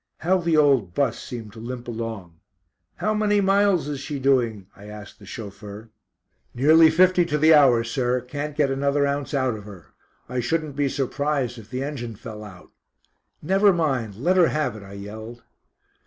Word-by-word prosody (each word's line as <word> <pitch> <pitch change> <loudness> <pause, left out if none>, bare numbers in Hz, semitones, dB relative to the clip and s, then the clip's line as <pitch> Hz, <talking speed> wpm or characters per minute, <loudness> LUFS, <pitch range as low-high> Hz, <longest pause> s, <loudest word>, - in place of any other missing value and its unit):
How 185 +3 +1
the 165 -2 +1
old 135 - +3
"bus" 140 - 0
seemed 115 -5 -8
to 115 - -11
limp 120 +1 -7
along. 110 -8 -6 0.6
"How 215 - -1
many 210 -1 +2
miles 195 -5 +2
is 145 -2 -4
she 145 +1 -5
doing?" 125 -7 +1
I 100 - -14
asked 105 0 -11
the 100 - -15
chauffeur. 105 +2 -9 0.6
"Nearly 160 +5 +6
fifty 180 +2 +4
to 150 -3 -1
the 155 +2 +5
hour, 130 -6 +5
sir, 125 +1 -1
can't 145 +4 -6
get 145 -3 +2
another 140 +1 +1
ounce 140 0 -2
out 130 -3 +1
of 105 -2 -9
her. 100 -5 -13 0.3
I 125 - -3
shouldn't 155 +3 -2
be 145 -1 0
surprised 135 -2 -2
if 110 -1 -14
the 130 +2 -3
engine 120 -6 -5
fell 105 +1 -9
out." 95 -4 -13 0.7
"Never 195 +5 +4
mind, 135 - -1
let 175 - +1
her 175 -3 +6
have 155 -6 -1
it," 110 - -10
I 100 0 -12
yelled. 110 +4 -9
135 Hz, 180 wpm, -23 LUFS, 110-150 Hz, 0.7 s, Nearly